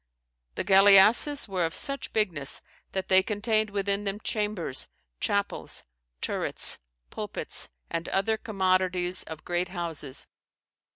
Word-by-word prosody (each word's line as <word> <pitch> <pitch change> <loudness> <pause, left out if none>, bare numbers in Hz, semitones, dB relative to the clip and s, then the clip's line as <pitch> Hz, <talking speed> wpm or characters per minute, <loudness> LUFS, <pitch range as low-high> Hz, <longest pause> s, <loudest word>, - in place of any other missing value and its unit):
"The - - -2
galliasses 205 +9 +6
were 185 -3 -1
of 165 - -2
such 275 0 0
bignesse, 165 -11 +2 0.3
that 190 -1 -3
they 190 0 +6
contained 215 +2 0
within 200 0 -1
them 200 0 -3
chambers, 210 - -2 0.3
chapels, 200 0 0 0.4
turrets, - - 0 0.3
pulpits, - - -2 0.2
and 165 0 -4
other 200 +3 +1
commodities 185 -4 0
of 160 -1 -9
great 175 +1 -1
houses. 165 -7 -4
195 Hz, 115 wpm, -27 LUFS, 180-210 Hz, 0.4 s, galliasses